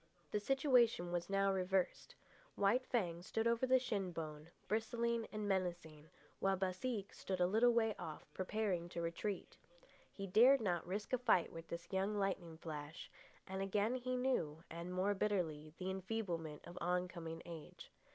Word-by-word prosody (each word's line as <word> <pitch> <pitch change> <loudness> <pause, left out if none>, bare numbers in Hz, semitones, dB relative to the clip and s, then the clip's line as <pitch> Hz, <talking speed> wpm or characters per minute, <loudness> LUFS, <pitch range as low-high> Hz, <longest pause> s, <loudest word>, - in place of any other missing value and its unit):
The 210 - +1
situation 240 - +3
was 175 +1 -1
now 195 0 +3
reversed. 185 0 0 0.4
White 230 +6 +3
Fang 175 -8 0
stood 225 +5 -1
over 235 +2 +3
the 260 0 +6
shin 210 -8 -1
bone, 155 -1 -6 0.2
bristling 230 +1 0
and 215 -1 -3
menacing, 170 -5 -2 0.3
while 195 0 +2
Baseek 195 +3 -2
stood 190 -1 -3
a 180 - +5
little 220 +6 +5
way 225 -2 +3
off, 160 -3 -6
preparing 185 -3 -1
to 170 - -4
retreat. 175 +4 -3 0.5
He 195 - -5
dared 235 +8 +7
not 175 -7 0
risk 205 +6 -3
a 255 - +3
fight 225 -8 +3
with 165 0 -8
this 170 +3 -7
young 195 +2 +1
lightning 190 -5 -1
flash, 155 -1 -7 0.3
and 190 0 -4
again 205 +4 +1
he 255 0 -1
knew, 165 - 0
and 170 +2 -5
more 185 +3 +2
bitterly, 170 -7 -1
the 185 0 -2
enfeeblement 185 -6 -3
of 175 +1 -8
oncoming 175 -2 -2
age. 165 -3 -9
190 Hz, 160 wpm, -39 LUFS, 170-220 Hz, 0.5 s, dared